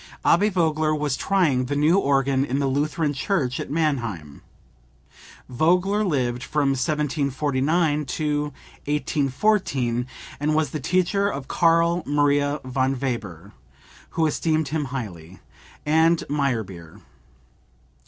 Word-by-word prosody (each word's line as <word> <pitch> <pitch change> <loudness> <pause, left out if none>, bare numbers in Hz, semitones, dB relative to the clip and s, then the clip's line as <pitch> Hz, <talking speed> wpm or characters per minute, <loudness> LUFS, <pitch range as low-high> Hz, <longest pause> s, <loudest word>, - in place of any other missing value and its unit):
Abbe 200 +5 +4
Vogler 155 -4 +1
was 150 -3 -1
trying 155 -11 +1
the 145 +3 -3
new 150 +4 +3
organ 135 -4 +2
in 135 -1 -2
the 140 - 0
Lutheran 145 +3 0
church 135 -3 -1
at - - -5
Mannheim. 120 - -2 1.1
Vogler 180 - +2
lived 125 - -1
from 145 -1 0
1749 145 +2 0
to 150 +1 -1 0.5
1814, 140 - 0 0.3
and 150 +1 0
was 155 -1 +1
the 155 - -3
teacher 185 +6 +1
of 135 -1 -6
Karl 170 +2 +3
Maria 145 0 +2
von 130 0 -1
Weber 105 -8 -4 0.7
(who 165 - +3
esteemed 155 0 0
him 155 -1 -1
highly) 95 -10 -7 0.5
and 160 +2 +3
Meyerbeer. 110 - -3
145 Hz, 115 wpm, -23 LUFS, 130-160 Hz, 1.1 s, Abbe